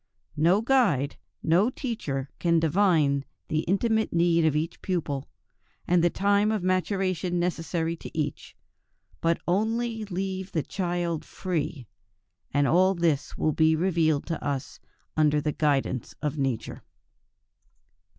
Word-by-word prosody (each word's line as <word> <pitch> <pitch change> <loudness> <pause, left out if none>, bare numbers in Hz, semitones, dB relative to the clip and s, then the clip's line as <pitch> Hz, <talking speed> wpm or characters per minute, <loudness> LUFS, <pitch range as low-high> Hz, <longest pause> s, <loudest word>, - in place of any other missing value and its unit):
No 170 +7 +3
guide, 225 - +2 0.3
no 180 +8 +4
teacher 150 - -4
can 170 -1 +3
divine 160 -4 +3 0.3
the 155 - +1
intimate 220 +6 +1
need 170 -1 +3
of 155 -2 +2
each 160 +3 -2
pupil, 150 -7 -2 0.6
and 175 -1 +3
the 175 - +5
time 200 +3 +2
of 215 -4 -1
maturation 185 -1 0
necessary 165 -1 -1
to - - -10
each; 150 -2 -3 0.6
but 165 0 +2
only 225 +4 0
leave 190 0 -4
the 155 - 0
child 175 -3 -2
free, 160 -7 -3 0.7
and 145 0 +2
all 185 +3 +4
this 165 -5 0
will 155 - +1
be 160 +1 +4
revealed 160 -4 +1
to 165 - -4
us 140 -2 -3 0.4
under 150 -1 +3
the 150 +1 -1
guidance 140 -5 0
of 150 -2 -2
nature. 135 -6 -2
170 Hz, 130 wpm, -27 LUFS, 150-190 Hz, 0.7 s, the